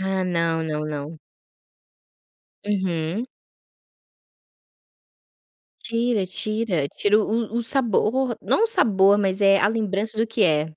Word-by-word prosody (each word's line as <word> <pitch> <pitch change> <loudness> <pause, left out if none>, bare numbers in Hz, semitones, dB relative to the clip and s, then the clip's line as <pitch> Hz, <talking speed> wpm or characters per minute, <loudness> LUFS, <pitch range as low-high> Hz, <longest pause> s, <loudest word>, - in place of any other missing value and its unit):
Ah, 190 0 -1
não, 165 -2 -1
não, 150 -1 -3
não. 150 +1 -6 1.5
Uhum. 190 +1 -2 2.6
Tira, 230 -3 -1
tira. 195 -5 -2
Tira 210 +8 +1
o 210 - +1 0.3
o - - -1
o - - -1
sabor. 245 0 0
Não 445 - +1
o - - +3
sabor, 200 - +4
mas, 195 0 0
eh, 195 0 +5
a 205 - +2
lembrança 215 -1 -1
do 225 - +1
que 225 0 -1
é. 155 -1 +1
195 Hz, 125 wpm, -22 LUFS, 170-225 Hz, 2.6 s, eh